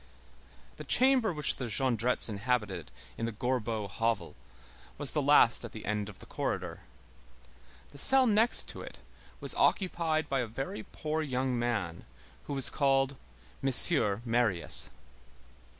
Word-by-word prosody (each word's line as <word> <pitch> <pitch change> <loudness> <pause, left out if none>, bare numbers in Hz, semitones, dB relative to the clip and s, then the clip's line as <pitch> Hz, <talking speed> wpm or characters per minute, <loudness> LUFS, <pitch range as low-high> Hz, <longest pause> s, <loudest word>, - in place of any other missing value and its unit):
The - - -9
chamber 255 -4 +2
which 150 -3 -3
the 130 - -6
Jondrettes 120 +1 +2
inhabited 105 - -4 0.3
in 115 - -3
the - - -5
Gorbeau 115 -2 -4
hovel 110 -3 -4 0.6
was 145 -2 +1
the 150 - -2
last 140 -5 +3
at 115 - -10
the 110 - -10
end 105 0 -4
of 100 - -13
the - - -15
corridor. - - -6 1.1
The 140 - -6
cell 265 - +8
next 225 +1 +1
to - - -9
it - - -12 0.4
was - - -4
occupied 165 -5 -2
by 135 -2 -3
a 125 - -4
very 115 0 -7
poor 155 +7 -6
young 130 -3 -3
man 105 -9 -5 0.4
who 145 - -7
was 135 -2 +1
called 135 -1 -1 0.5
M. 135 - -1 0.5
Marius. 115 -7 +4
125 Hz, 140 wpm, -28 LUFS, 110-145 Hz, 1.1 s, cell